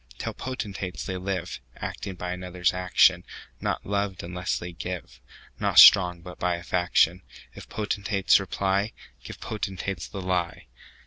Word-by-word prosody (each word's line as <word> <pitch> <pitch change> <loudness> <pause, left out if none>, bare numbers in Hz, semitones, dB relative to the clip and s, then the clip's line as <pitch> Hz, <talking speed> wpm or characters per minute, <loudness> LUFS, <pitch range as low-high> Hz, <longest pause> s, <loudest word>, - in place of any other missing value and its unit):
Tell - - -4
potentates, 95 - -5
they 95 - -3
liveActing 90 -1 -5
by 90 0 -3
others' 90 0 -1
action; 90 0 +4 0.4
Not - - -2
loved 100 -1 -2
unless 90 +1 -2
they 90 0 -6
give, 85 - -7 0.4
Not - - 0
strong, 90 -3 +8
but 90 -1 -10
by 90 -1 +1
a 85 - -8
faction:If 90 0 -1
potentates 100 -2 +1
reply, 95 +2 -1 0.3
Give - - -9
potentates 95 -4 -4
the 100 - -7
lie. 90 -2 -2
90 Hz, 130 wpm, -26 LUFS, 90-100 Hz, 0.4 s, strong